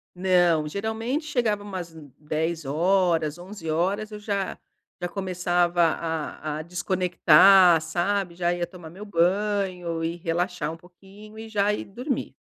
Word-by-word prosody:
Não. 175 -4 +3
Geralmente, 220 - -3
chegava 235 -8 0
umas 185 -5 -6
n 150 -4 -13
22:00 155 +2 -3
horas, 165 0 +1
23:00 180 -2 -8
horas 195 +7 -1
eu 210 - -7
já 200 -2 -3 0.4
já 175 - -2
começava 175 -2 0
a 160 -2 -2
a 155 - -4
desconectar, 180 0 +5
sabe? 175 +3 -1
Já 175 0 0
ia 175 0 -2
tomar 175 -2 -12
meu 195 +6 -10
banho 185 -2 0
e 165 +1 -2
relaxar 175 -1 -2
um 165 - -8
pouquinho 195 +5 -16
e 225 - -8
já 205 -2 +1
ir 210 - -3
dormir. 250 +7 -4
180 Hz, 145 wpm, -25 LUFS, 165-200 Hz, 0.4 s, desconectar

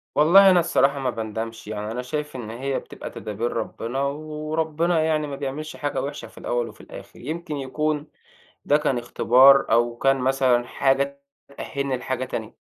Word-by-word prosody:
والله 190 +6 +7
أنا 180 -1 +6
الصراحة 140 -4 +2
ما 130 -1 -1
باندمش. 110 -1 -5
يعني 105 0 -4
أنا 125 +2 -3
شايف 150 +2 -4
إن 115 -4 -6
هي 130 +4 -2
بتبقى - - -9
تدابير 110 +3 -4
ربِّنا 115 +3 -3
وربِّنا 155 +3 -1
يعني 155 -1 0
ما 140 - -5
بيعملش 145 +3 -5
حاجة 145 -1 -2
وِحشة 145 +1 -5
في - - -21
الأول 120 -1 -2
وفي - - -15
الآخِر. - - -12
يمكن 155 +2 -5
يكون 150 +2 -2 0.6
ده 145 - +4
كان 135 -4 0
اختبار 130 +3 +5
أو 120 0 +2
كان 135 +1 +3
مثلًا 130 -2 +2
حاجة 140 +1 0 0.4
تأهِّلني 140 -2 -2
لحاجة 130 +1 -3
تانية. 110 -3 -6
135 Hz, 165 wpm, -24 LUFS, 120-150 Hz, 0.6 s, والله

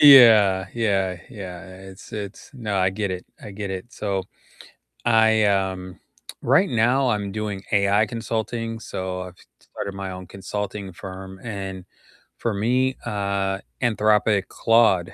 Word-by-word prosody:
Ye 145 -1 +11
yeah, 100 -5 +5
yeah, 95 -5 0
yeah, 95 -7 -8 0.3
it's 95 - -13
it's 105 -1 -7
no, 110 -6 -3
I 95 0 +4
get 100 +1 -2
it, 90 -1 -5 0.2
I - - -8
get 100 0 -5
it, 95 +5 -6
so 100 -3 -2 0.8
I, 110 -2 +5
um, 95 -2 0 0.4
right 145 +11 +4
now 125 +2 +3
I'm 105 -3 -1
doing 105 -2 -3
AI 100 +1 +4
consulting, 115 +1 -3
so 95 -3 -4
I've 90 -1 -10 0.2
started 100 - -6
my 95 -1 -5
own 90 0 -8
consulting 100 0 -5
firm, 95 +1 -9
and 95 -5 -5 0.5
for 115 - -1
me, 125 +6 +1
uh, 100 -3 -1 0.2
Anthropic 105 -3 +3
Claude 115 -6 +3
100 Hz, 140 wpm, -23 LUFS, 95-110 Hz, 0.8 s, Ye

